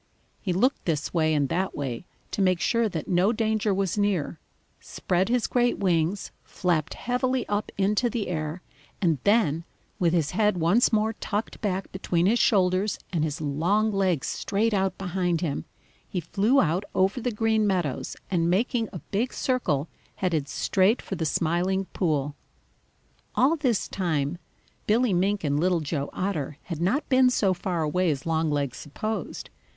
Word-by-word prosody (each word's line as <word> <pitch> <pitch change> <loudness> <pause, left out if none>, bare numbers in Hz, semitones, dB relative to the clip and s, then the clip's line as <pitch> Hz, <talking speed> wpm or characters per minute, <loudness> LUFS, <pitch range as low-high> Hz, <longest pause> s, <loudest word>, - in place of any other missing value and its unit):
He 190 - -1
looked 245 +10 +1
this 155 -2 -1
way 160 -2 +2
and 145 -3 +2
that 185 +3 -1
way 135 +2 -4 0.2
to - - -1
make 185 -2 +3
sure 230 +4 +2
that 165 -5 -5
no 185 +4 +3
danger 220 -2 0
was 195 +1 0
near, 185 -6 0 0.4
spread 185 +3 -1
his 245 -1 +2
great 245 -1 +1
wings, 180 0 0
flapped 170 -4 -1
heavily 250 0 -1
up 205 +1 -2
into 205 +5 +2
the 225 -2 -2
air, 160 0 -3 0.4
and 165 -7 +1
then, 175 -7 +3 0.4
with 170 -2 +3
his 160 -4 +1
head 210 0 +2
once 175 +9 +3
more 220 0 +2
tucked 210 0 -4
back 195 -2 -2
between 175 -2 0
his 230 +5 +3
shoulders 190 0 +2 0.2
and 160 -3 +1
his 155 0 -2
long 175 +10 +1
legs 185 -7 +1
straight 215 +3 0
out 195 -1 0
behind 180 -3 -1
him, 145 - -2 0.4
he 185 - -2
flew 205 - +2
out 175 - +2
over 195 +6 +2
the 245 - 0
Green 220 -1 +1
Meadows, 175 -9 -1 0.2
and 170 -2 +2
making 225 +4 +1
a 180 - -7
big 230 +6 0
circle, 165 - 0 0.3
headed 165 -6 -1
straight 190 - +2
for - - -7
the 165 -4 -1
Smiling 180 +5 0
Pool. 150 -5 0 1.0
All 275 +6 +4
this 255 - 0
time 160 -3 -1 0.5
Billy 225 0 +3
Mink 195 +3 +1
and 145 -1 +1
Little 180 +1 +2
Joe 145 -2 -3
Otter 155 -7 -3
had 170 -3 -5
not 210 - +1
been 255 -1 +5
so 200 -6 +2
far 175 -2 -2
away 175 +4 +1
as 140 -3 -2
Longlegs 150 -5 0
supposed. 215 +9 -5
185 Hz, 165 wpm, -26 LUFS, 165-210 Hz, 1.0 s, been